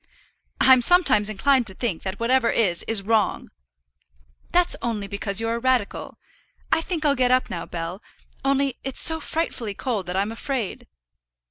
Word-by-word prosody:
"I'm 260 Hz, -1 st, +6 dB
sometimes 240 Hz, -, +5 dB
inclined 255 Hz, +4 st, +2 dB
to 190 Hz, -, -2 dB
think, 210 Hz, -8 st, -3 dB
that 190 Hz, +1 st, -5 dB
whatever 235 Hz, +1 st, +2 dB
is, 185 Hz, -7 st, +1 dB
is 220 Hz, -3 st, +1 dB
wrong." 215 Hz, -1 st, 0 dB, 1.0 s
"That's 355 Hz, 0 st, +3 dB, 0.4 s
because 200 Hz, 0 st, -1 dB
you're 225 Hz, 0 st, -1 dB
a 235 Hz, -, -2 dB
radical. 255 Hz, -4 st, -1 dB, 0.5 s
I -, -, +3 dB
think 325 Hz, -2 st, -4 dB
I'll 290 Hz, -, +4 dB
get 255 Hz, -2 st, +1 dB
up 255 Hz, 0 st, +1 dB
now, 170 Hz, -, -5 dB
Bell; 170 Hz, +3 st, -6 dB, 0.4 s
only 275 Hz, -1 st, 0 dB
it's 270 Hz, -1 st, -5 dB
so 320 Hz, 0 st, +2 dB
frightfully 265 Hz, -11 st, -3 dB
cold 220 Hz, -7 st, -3 dB
that 180 Hz, -, -4 dB
I'm 200 Hz, +3 st, -1 dB
afraid." 235 Hz, -2 st, -4 dB
235 Hz, 155 wpm, -23 LUFS, 200-270 Hz, 1.0 s, I'm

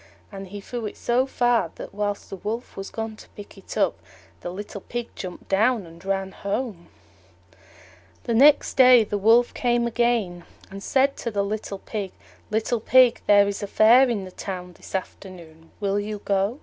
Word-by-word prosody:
And 195 Hz, -1 st, -8 dB
he 205 Hz, +2 st, -8 dB
threw 235 Hz, +1 st, -5 dB
it -, -, -9 dB
so 250 Hz, +2 st, +1 dB
far 245 Hz, -3 st, +1 dB
that, -, -, -9 dB
while 205 Hz, 0 st, -1 dB
the 195 Hz, -, -10 dB
Wolf 220 Hz, +6 st, -5 dB
was 195 Hz, 0 st, -6 dB
gone 225 Hz, -1 st, -5 dB
to -, -, -15 dB
pick 205 Hz, 0 st, -11 dB
it 195 Hz, -, -9 dB
up, -, -, +1 dB, 0.4 s
the -, -, -6 dB
little 200 Hz, +2 st, -7 dB
Pig 240 Hz, +3 st, -5 dB
jumped 180 Hz, -2 st, -8 dB
down 220 Hz, +2 st, +2 dB
and 165 Hz, +1 st, -15 dB
ran 195 Hz, 0 st, -2 dB
home. 200 Hz, -4 st, -4 dB, 1.4 s
The 235 Hz, -, -2 dB
next 280 Hz, +5 st, +5 dB
day 250 Hz, -3 st, +7 dB
the 205 Hz, -1 st, -3 dB
Wolf 230 Hz, +4 st, +4 dB
came 240 Hz, -1 st, +1 dB
again, 230 Hz, -7 st, 0 dB, 0.3 s
and 195 Hz, 0 st, -8 dB
said 275 Hz, +5 st, +1 dB
to 235 Hz, -, -3 dB
the 200 Hz, -2 st, -1 dB
little 205 Hz, 0 st, -4 dB
Pig, 200 Hz, -1 st, -6 dB, 0.4 s
"Little 220 Hz, +2 st, 0 dB
Pig, 250 Hz, +1 st, +4 dB
there 205 Hz, -1 st, +6 dB
is 200 Hz, 0 st, -3 dB
a 205 Hz, -, -3 dB
Fair 240 Hz, +6 st, +5 dB
in 205 Hz, -5 st, -2 dB
the 185 Hz, -, -10 dB
Town 180 Hz, -2 st, -7 dB
this -, -, -10 dB
afternoon: 170 Hz, -4 st, -8 dB
will 200 Hz, -1 st, 0 dB
you 210 Hz, +1 st, -4 dB
go?" 200 Hz, +4 st, 0 dB
205 Hz, 185 wpm, -24 LUFS, 195-235 Hz, 1.4 s, day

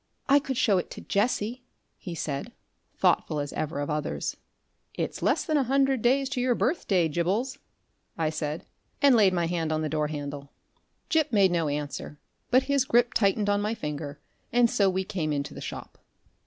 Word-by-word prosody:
"I 280 Hz, +1 st, +6 dB
could 270 Hz, -3 st, -4 dB
show 200 Hz, -6 st, +3 dB
it -, -, -5 dB
to -, -, -8 dB
Jessie," 225 Hz, +3 st, 0 dB, 0.3 s
he 175 Hz, -3 st, -7 dB
said, 140 Hz, -3 st, -4 dB, 0.4 s
thoughtful 150 Hz, -, +2 dB
as 145 Hz, 0 st, -4 dB
ever 155 Hz, -1 st, -3 dB
of 145 Hz, +2 st, -2 dB
others. 150 Hz, -1 st, -2 dB, 0.6 s
"It's -, -, -3 dB
less -, -, +2 dB
than 310 Hz, -3 st, +1 dB
a 280 Hz, -, +3 dB
hundred 270 Hz, -1 st, +2 dB
days 265 Hz, +4 st, +3 dB
to 265 Hz, -2 st, -2 dB
your 250 Hz, -1 st, +2 dB
birthday, 200 Hz, -, +1 dB
Gibbles," 185 Hz, -, -1 dB, 0.6 s
I 160 Hz, -2 st, 0 dB
said, 155 Hz, 0 st, -4 dB, 0.3 s
and 280 Hz, -2 st, +6 dB
laid 205 Hz, -4 st, +5 dB
my 175 Hz, -2 st, +1 dB
hand 165 Hz, -2 st, -1 dB
on 155 Hz, 0 st, 0 dB
the 155 Hz, -, -1 dB
door 150 Hz, -1 st, 0 dB
handle. 145 Hz, -2 st, -6 dB, 0.6 s
Gip 315 Hz, -5 st, +2 dB
made 200 Hz, -4 st, +4 dB
no 165 Hz, -3 st, +1 dB
answer, 145 Hz, 0 st, -4 dB, 0.3 s
but 255 Hz, +2 st, +5 dB
his 280 Hz, -2 st, +2 dB
grip 240 Hz, -1 st, +3 dB
tightened 205 Hz, 0 st, +2 dB
on 205 Hz, 0 st, +2 dB
my 210 Hz, +2 st, -1 dB
finger, 150 Hz, -6 st, -5 dB, 0.3 s
and 240 Hz, -1 st, +4 dB
so 200 Hz, -5 st, +3 dB
we 190 Hz, +1 st, 0 dB
came 185 Hz, -6 st, -2 dB
into 140 Hz, -1 st, -2 dB
the -, -, -8 dB
shop. -, -, -8 dB
190 Hz, 185 wpm, -27 LUFS, 155-245 Hz, 0.6 s, I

